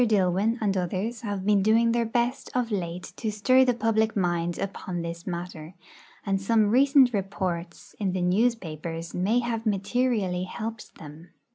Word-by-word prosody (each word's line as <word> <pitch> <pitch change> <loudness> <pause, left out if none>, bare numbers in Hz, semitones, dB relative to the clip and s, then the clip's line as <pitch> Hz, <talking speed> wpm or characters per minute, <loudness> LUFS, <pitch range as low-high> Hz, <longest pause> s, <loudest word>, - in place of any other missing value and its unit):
Dillwyn 205 0 +2
and 205 -3 0
others 190 +6 -2
have 205 -4 -4
been 205 -1 +4
doing 225 +3 +4
their 235 -1 +1
best 240 +4 -1
of 245 -2 0
late 180 -3 -4
to 220 - -2
stir 255 +5 +4
the 250 -2 +2
public 220 -1 +1
mind 175 -3 0
upon 185 -3 -4
this 170 +1 -6
matter, 175 -2 -6 0.5
and 195 -1 0
some 215 0 +2
recent 265 0 +5
reports 185 -4 -4
in 200 -3 0
the 185 - -1
newspapers 170 -5 -1
may 210 +7 +1
have 230 -2 -3
materially 205 -3 0
helped 220 +3 -7
them. 155 +3 -12
200 Hz, 155 wpm, -26 LUFS, 180-230 Hz, 0.5 s, recent